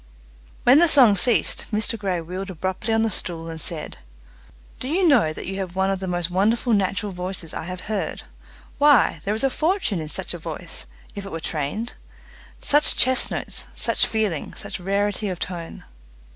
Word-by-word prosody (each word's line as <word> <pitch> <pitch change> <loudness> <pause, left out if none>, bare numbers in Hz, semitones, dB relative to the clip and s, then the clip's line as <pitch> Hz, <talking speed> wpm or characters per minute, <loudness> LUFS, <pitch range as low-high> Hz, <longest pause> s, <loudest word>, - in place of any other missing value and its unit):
When 255 +4 +7
the 345 - +6
song 255 -9 +7
ceased 225 +5 +1
Mr 220 +2 -1
Grey 195 -5 -2
wheeled 185 +4 -6
abruptly 190 +5 -3
on 225 0 +3
the 225 - 0
stool 165 -3 -5
and 160 -1 -7
said, 155 0 -5 0.8
"Do 255 - -5
you 350 +5 +2
know 240 - +4
that - - -7
you 195 +1 -4
have 185 -2 -5
one 190 +1 +1
of 195 - -2
the 190 - -4
most 175 -1 -1
wonderful 225 +6 +2
natural 200 +1 0
voices 180 -2 -6
I - - -5
have 180 +1 -6
heard. 215 -2 -3 0.6
Why, 285 - +5
there 205 +2 0
is 220 - -2
a 270 - +2
fortune 320 - 0
in 155 - -6
such 185 +3 -3
a 175 - -6
voice 155 - -6 0.3
if 200 - -6
it 195 - -8
were, 165 - -4
trained! 160 +10 -3 0.7
Such 295 +1 +4
chest 260 0 +4
notes, - - -3
such - - +4
feeling, 215 -9 -2
such - - -6
rarity 200 +2 -1
of 180 - -4
tone!" 170 -2 -6
195 Hz, 185 wpm, -23 LUFS, 175-225 Hz, 0.8 s, When